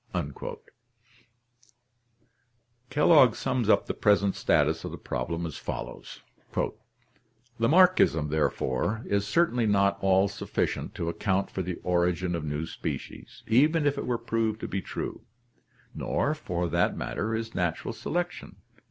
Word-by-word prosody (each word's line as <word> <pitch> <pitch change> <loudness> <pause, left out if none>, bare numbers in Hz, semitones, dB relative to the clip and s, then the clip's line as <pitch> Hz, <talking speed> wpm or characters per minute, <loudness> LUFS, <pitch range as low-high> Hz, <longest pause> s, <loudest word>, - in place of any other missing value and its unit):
Kellogg 145 -4 +5
sums 120 -4 -1
up - - +4
the - - -3
present 100 -1 +3
status - - +2
of - - -4
the - - -7
problem 85 +7 -3
as 80 -5 -6
follows: - - -7 1.4
Lamarckism, 140 - +4
therefore, 80 - 0
is 100 0 0
certainly 125 -9 +2
not 100 -1 +2
all 95 0 +4
sufficient - - -3
to 85 - -3
ac 85 - -3
count 100 -1 0
for 95 - -3
the 90 -1 -3
origin 90 0 +1
of 85 -2 -2
new 75 +1 -2
species, - - -7
even 150 +7 +3
if 145 -1 +2
it 140 - -4
were 120 -1 +1
proved 115 -2 -1
to - - -3
be 100 - -2
true; - - -5 0.7
nor 145 - 0
for 90 - -3
that 85 +2 +1
matter 110 +2 -2
is 115 0 -4
natural 90 -3 -2
selection. 175 +1 -4
100 Hz, 135 wpm, -28 LUFS, 85-120 Hz, 1.4 s, Kellogg